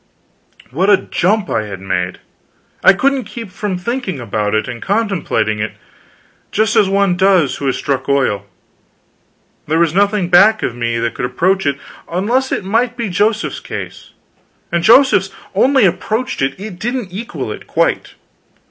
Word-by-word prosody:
What 180 +9 +1
a 205 - +7
jump 200 +2 0
I 110 - 0
had 95 -2 -7
made! 90 -1 -2 0.7
I - - +8
couldn't 270 +5 +1
keep 210 -1 -8
from 200 -1 -3
thinking 210 - -3
about 105 -2 -2
it, 110 - 0
and 120 -2 -7
contemplating 195 - 0
it, 110 0 -3 0.8
just 220 +1 +1
as 200 - +4
one 195 -2 +2
does 185 -6 +3
who 140 - -3
has 130 - +1
struck 140 0 -2
oil. 115 -8 +1 1.2
There 155 +2 +1
was 170 -1 +2
nothing 200 -1 +2
back 200 +5 +5
of 120 - -2
me 120 -1 -1
that 115 0 -1
could - - -3
approach 180 +8 +1
it, 140 -1 0 0.3
unless 235 +10 0
it - - -1
might 230 +5 0
be 235 -3 -2
Joseph's 215 +4 0
case; - - -8 0.6
and 170 -1 0
Joseph's 230 -4 +5 0.2
only 260 +4 +4
approached 220 - -1
it, 135 +5 -1
it 195 -3 -8
didn't 235 -3 -3
equal 230 +5 -5
it, - - -9
quite. - - 0
190 Hz, 160 wpm, -16 LUFS, 135-215 Hz, 1.2 s, I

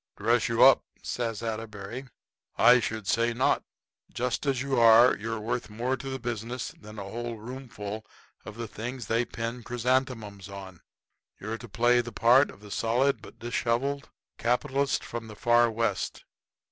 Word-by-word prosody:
"Dress - - +2
you - - +4
up?" - - +8 0.2
says 115 -2 -3
Atterbury; 110 +2 -5 0.5
"I 120 +2 +7
should 110 -2 -3
say 115 +3 +1
not! 130 - +2 0.5
Just 125 +3 -2
as 135 -2 +1
you 135 -3 0
are 115 +2 +7
you're 115 +2 -4
worth 115 +2 -3
more 120 +5 -1
to 135 +1 -7
the 130 - -3
business 120 0 -4
than 105 0 -11
a 100 - -4
whole 115 +4 -5
roomful 110 -3 -7 0.4
of 110 - -9
the 115 -1 -4
things 120 +4 -6
they 115 +2 +1
pin 115 +2 -5
chrysanthemums 120 -5 -1
on. 95 -3 -9 0.6
You're 110 +2 -4
to 120 0 -10
play 120 +3 +3
the 120 0 -8
part 120 +6 +5
of 100 - -13
the 105 -1 -12
solid 125 +6 +1
but - - -13
disheveled 120 +4 -1 0.3
capitalist 135 +3 +1
from 115 -1 -6
the 105 - -10
Far 120 +2 +4
West. 110 -3 -2
115 Hz, 160 wpm, -28 LUFS, 110-125 Hz, 0.6 s, up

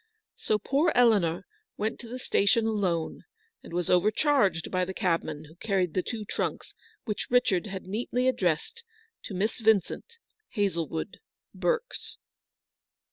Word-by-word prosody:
So 215 - +1
poor 275 - +2
Eleanor 205 -9 +4 0.3
went 215 +2 -2
to 235 - -9
the 245 +2 -5
station 225 -2 +2
alone, 190 -7 0 0.4
and - - -12
was 175 0 -1
overcharged 200 - +3
by 185 -1 +1
the 190 +1 -4
cabman 165 -6 -1
who 155 - -15
carried 185 -4 0
the 185 - +1
two 220 +1 -5
trunks - - -3 0.3
which 210 -3 -3
Richard 220 -6 +3
had 190 -2 -6
neatly 240 +5 -1
addressed 230 - 0 0.4
to 195 - -5
Miss 210 +6 -1
Vincent, 220 - +1 0.4
Hazlewood, 170 -4 -1 0.3
Berks. - - -2
205 Hz, 135 wpm, -28 LUFS, 180-235 Hz, 0.4 s, Eleanor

